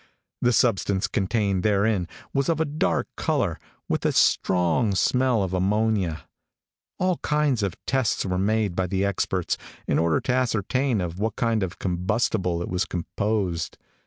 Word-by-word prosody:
The 125 - +3
substance 100 -4 +2
contained 100 -1 0
therein, 100 -2 +2 0.3
was 140 +1 +1
of 165 -2 +1
a 160 - +2
dark 150 +1 0
color, - - 0 0.3
with - - -1
a - - +2
strong 95 +4 +2
smell 125 +1 +2
of 95 -1 -3
ammonia. 95 -3 +1 0.7
All 185 -1 +1
kinds 150 -6 +1
of 100 -4 -1
tests 130 -4 0
were 90 -1 -1
made 105 -1 +1
by 95 0 0
the 95 +2 0
experts, 95 -2 -1 0.3
in - - +1
order 80 -1 +2
to 125 - -1
ascertain 125 -1 +1
of 90 +1 -4
what 110 0 -1
kind 115 -2 +1
of 95 -1 -3
combustible 90 -1 0
it - - -5
was 90 +1 -1
composed. 90 -1 -2
100 Hz, 155 wpm, -25 LUFS, 90-115 Hz, 0.7 s, The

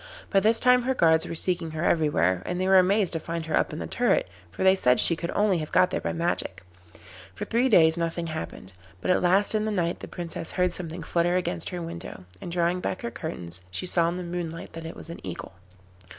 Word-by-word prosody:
By 195 - +5
this 220 +3 +3
time 250 0 +5
her 260 +2 -1
guards 160 -6 +3
were - - -5
seeking 175 0 -1
her 155 - -2
everywhere, 95 - +2
and 180 0 -2
they 185 - 0
were 190 0 +7
amazed 195 +1 +2
to 165 - -1
find 165 0 -5
her 160 - -1
up - - +1
in 150 - -6
the - - -4
turret, 240 - +1 0.2
for 85 - -5
they 190 0 +6
said 125 -10 +3
she 170 - +5
could 170 +1 -5
only 205 -4 +2
have 155 - -6
got 185 +1 +4
there - - -2
by - - -2
magic. 165 - -2 0.7
For - - -5
three 240 +3 +1
days 160 -6 +5
nothing 170 0 -2
happened, 155 - -7 0.3
but 185 - 0
at - - +2
last 190 +4 +3
in 215 0 +1
the 215 - -1
night 175 -4 -1
the - - -8
Princess 170 -2 -6
heard 180 -1 +1
something 170 -1 -6
flutter 175 +1 +1
against 90 - -1
her 175 -1 -5
window, 170 - -8 0.2
and 175 - -6
drawing 175 +1 +1
back 185 - -4
her 120 - -3
curtains 90 -7 -6
she 90 - -4
saw 170 -2 +2
in 175 - -4
the 180 - -4
moonlight 170 -1 -5
that 165 0 -8
it 165 - -7
was 165 - -8
an - - -10
Eagle. 90 - -7
170 Hz, 240 wpm, -26 LUFS, 160-185 Hz, 0.7 s, were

